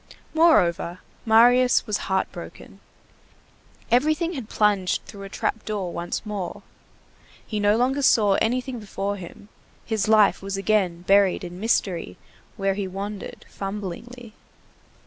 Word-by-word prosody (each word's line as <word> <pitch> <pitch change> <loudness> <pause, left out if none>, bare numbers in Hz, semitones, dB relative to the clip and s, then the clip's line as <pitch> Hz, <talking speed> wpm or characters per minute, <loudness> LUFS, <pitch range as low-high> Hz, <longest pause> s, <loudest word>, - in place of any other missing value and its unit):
Moreover, 180 - +3 0.3
Marius 245 +3 +5
was 210 -2 -1
heart 190 0 0
broken. - - -11 1.1
Everything 310 +7 +2
had 255 -8 -6
plunged 205 -3 +1
through 200 - -11
a 195 - -8
trap 220 - -2
door 200 -5 -3
once 175 +5 -4
more. 200 -4 -5 0.8
He 215 - -3
no 205 +1 +3
longer 265 +4 +1
saw 215 -7 +4
anything 250 +1 -1
before 200 -1 -4
him; 185 +3 -11 0.4
his 220 -3 -1
life 215 -2 +4
was 195 0 -4
again 195 -4 0
buried 195 0 +3
in 175 0 -8
mystery 185 - -1 0.4
where 195 0 +1
he 195 0 -3
wandered 200 +2 -7
fumblingly. 210 +4 -7
205 Hz, 125 wpm, -24 LUFS, 195-235 Hz, 1.1 s, Marius